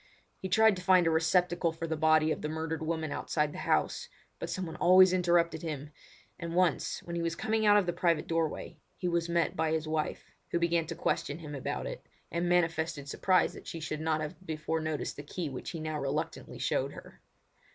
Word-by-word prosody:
He 190 - -5
tried 220 +2 +5
to - - -6
find 180 -1 +5
a 165 - +3
receptacle 170 +1 +2
for 165 +1 -5
the 160 -1 -2
body 155 0 +4
of - - -2
the 150 - -3
murdered 160 +1 -3
woman 160 -1 -2
outside 150 0 -1
the - - -7
house, - - 0 0.3
but - - -4
someone 180 -4 -4
always 185 +1 +7
interrupted 170 -3 +2
him; 150 -3 -5 0.5
and 170 -1 -4
once, 180 -1 +1
when 170 - -6
he 170 - -1
was 165 0 -1
coming 220 +3 0
out 205 0 +7
of 205 - +3
the 175 - -1
private 170 -3 +1
doorway, 165 -2 -2 0.2
he 180 - -2
was 170 -1 0
met 170 -1 +1
by 160 0 +1
his 160 -1 -1
wife, 155 -1 -2 0.2
who - - 0
began 170 -1 +1
to 165 - -5
question 145 - -1
him 155 -3 -8
about 140 - -3
it, - - -6 0.3
and 170 +1 0
manifested 165 -4 +1
surprise 185 +6 +2
that - - -12
she 165 - -5
should 155 -1 -4
not 155 -1 0
have 155 +4 -6
before 160 -1 -2
noticed 155 -1 -3
the - - -5
key 155 +2 -4
which 130 - -6
he 165 - -5
now 155 -1 -3
reluctantly 140 +2 -3
showed - - -1
her. - - -13
165 Hz, 215 wpm, -31 LUFS, 155-175 Hz, 0.5 s, always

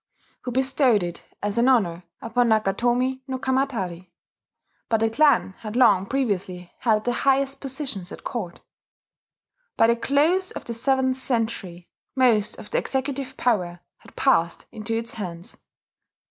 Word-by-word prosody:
who 250 - -5
bestowed 260 -4 +3
it 175 -1 -5 0.2
as 205 +2 0
an 245 +3 +4
honour 180 -10 +2 0.2
upon 235 +1 +1
Nakatomi 240 +5 +1
no 260 -1 -3
Kamatari; 235 -10 -2 0.8
but 225 - +2
the 225 0 +1
clan 290 -6 +3
had 215 0 -7
long 205 -7 +4
previously 190 -9 -2
held 215 -3 +2
the 245 - +1
highest 275 +2 +1
positions 265 - -4
at - - -10
Court. 190 -8 -5 1.2
By - - +6
the 235 +1 +4
close 305 +10 +2
of - - -7
the 235 - -4
seventh 260 +2 +1
century 220 -9 -2 0.3
most 230 -6 +2
of 210 - -11
the - - +2
executive 265 0 -3
power 180 -8 0 0.2
had - - -19
passed 170 +1 +2
into 225 +1 -3
its 230 0 -4
hands. 180 -5 -6
235 Hz, 145 wpm, -24 LUFS, 195-265 Hz, 1.2 s, By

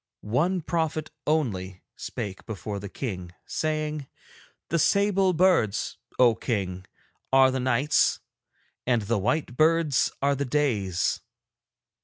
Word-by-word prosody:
One 165 - +1
prophet 160 -1 -2 0.2
only 100 -12 -1
spake 95 -2 -6
before 105 -1 -5
the 100 0 -7
King, 90 -8 -5
saying: 155 -2 -2 0.6
"The 170 - +1
sable 195 +2 +3
birds, 165 - +2 0.2
O 125 -2 +6
King, 95 -6 -3 0.4
are 135 0 +6
the 130 - -1
nights, 130 +4 +2 0.7
and 120 -3 +2
the 110 +1 0
white 125 +4 -1
birds 155 -1 +3
are 140 +1 +2
the 140 0 -1
days. 120 - 0
130 Hz, 115 wpm, -26 LUFS, 105-155 Hz, 0.7 s, O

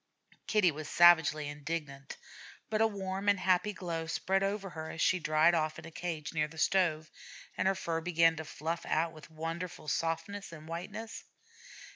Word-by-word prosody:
Kitty 210 -5 +4
was 155 0 -7
savagely 165 -3 +5
indignant, 145 -2 -5 0.5
but 215 0 +1
a 225 - +6
warm 195 -1 -2
and 200 -1 +3
happy 185 +3 +2
glow 170 -4 -4
spread 190 +3 0
over 195 -1 -2
her 160 -1 -6
as - - -7
she 185 +3 +3
dried 155 +1 +4
off 155 -2 0
in - - -9
a 165 - -9
cage 165 -2 -4
near 155 -1 +1
the 160 +1 -14
stove, 160 -3 +1 0.4
and - - +1
her 195 - +3
fur 165 -3 -2
began 165 -1 +3
to 160 - -4
fluff 165 +2 -4
out 165 +1 +1
with 155 -1 -13
wonderful 165 +1 -5
softness 165 +6 -2
and 155 -1 -11
whiteness. 210 +7 -6
165 Hz, 175 wpm, -32 LUFS, 155-190 Hz, 0.5 s, a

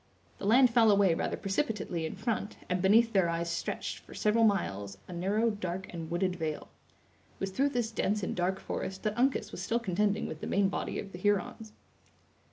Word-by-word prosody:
The 200 - -3
land 250 +3 +6
fell 230 -2 +5
away 200 -4 +5
rather - - -2
precipitately 195 - -2
in - - -7
front, 220 -3 -3
and 180 0 0
beneath 225 +4 +5
their 190 -4 +3
eyes 170 0 -1
stretched, 170 - -3
for - - -14
several 215 +2 +2
miles, 100 - 0
a - - -8
narrow, 205 +6 +1
dark, 190 -2 -5
and 165 -2 -6
wooded 180 +1 0
vale. 155 -2 -4 0.7
It - - -30
was 195 0 -2
through 275 +8 +2
this 240 -4 -1
dense 210 -2 0
and - - -2
dark 185 +2 0
forest 190 0 -5
that 215 0 0
Uncas 260 +3 +1
was - - -6
still 230 - 0
contending 210 0 0
with 155 - -6
the - - -4
main 195 -1 +2
body - - -3
of 195 - -6
the 175 - -8
Hurons. 205 +2 0
195 Hz, 200 wpm, -30 LUFS, 175-220 Hz, 0.7 s, land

